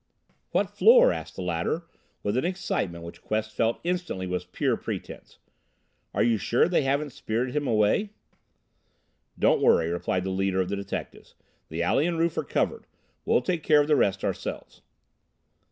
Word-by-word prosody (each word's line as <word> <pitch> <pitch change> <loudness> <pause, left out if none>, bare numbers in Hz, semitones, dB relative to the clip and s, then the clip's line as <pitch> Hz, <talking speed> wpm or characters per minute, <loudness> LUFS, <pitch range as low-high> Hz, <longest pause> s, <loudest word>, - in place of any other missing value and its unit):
"What - - 0
floor?" - - +6
asked - - -7
the 95 - -5
latter, 90 - -1 0.4
with 100 +2 -1
an 130 - +1
excitement 100 - -2
which 85 - -10
Quest 110 0 -2
felt 115 +1 0
instantly 175 - -2
was 90 0 -3
pure 90 - 0
pretense. - - -7 0.8
"Are - - +3
you 115 -2 +2
sure 115 +8 +2
they 175 -2 +2
haven't 140 +2 0
spirited 125 0 -3
him 145 -2 0
away?" 110 - +2 1.3
"Don't - - +3
worry," 85 0 +4
replied 90 +1 -1
the 95 - -3
leader 95 0 0
of 95 -1 0
the 100 - -1
detectives. 100 0 -7 0.3
"The 80 +2 -2
alley 140 - +2
and 170 -1 -1
roof 165 0 +1
are - - -1
covered. - - -2 0.4
We'll - - +3
take 170 +4 -1
care 150 -1 +5
of 145 - +2
the 150 - +4
rest 100 -6 +1
ourselves." - - -5
110 Hz, 170 wpm, -26 LUFS, 95-155 Hz, 1.3 s, floor